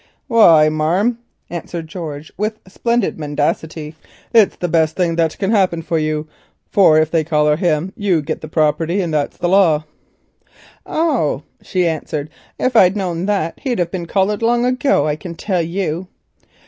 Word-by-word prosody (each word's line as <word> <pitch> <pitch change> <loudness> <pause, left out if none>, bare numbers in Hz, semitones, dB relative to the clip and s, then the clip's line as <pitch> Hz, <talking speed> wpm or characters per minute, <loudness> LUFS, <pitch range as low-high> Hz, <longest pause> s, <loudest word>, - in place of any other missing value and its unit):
"Why, 170 - +6
marm," 175 +10 +1 0.3
answered 170 -1 -5
George 155 -3 -7
with 215 +2 -3
splendid 235 0 -1
mendacity, 150 +1 -2 0.4
"it's 220 -5 +5
the 175 - -3
best 160 -1 +1
thing 175 -3 0
that 165 -1 +1
can 195 +1 -1
happen 185 -6 +2
for 165 0 -1
you, 155 0 -2 0.4
for 175 -6 +5
if 155 0 +1
they 165 -2 +2
collar 150 -1 +2
him 170 +2 0
you 195 -8 0
git 155 +2 -4
the 155 - -7
property, 160 +4 +1
and 170 -4 -2
that's 150 -2 -1
law." 175 -4 +4 1.0
"Oh," 275 - 0 0.2
she 180 -2 -1
answered, 155 -2 -3 0.3
"if 255 -1 -1
I'd 190 -2 +5
known 180 -2 -2
that 190 -6 -1
he'd 255 -5 -2
have 175 -1 -1
been 175 -3 -4
collared 200 +3 0
long 240 +1 +2
ago, 255 - +2
I 150 -1 0
can 170 +3 -8
tell 185 +1 -1
you." 175 0 -3
170 Hz, 160 wpm, -18 LUFS, 155-200 Hz, 1.0 s, Why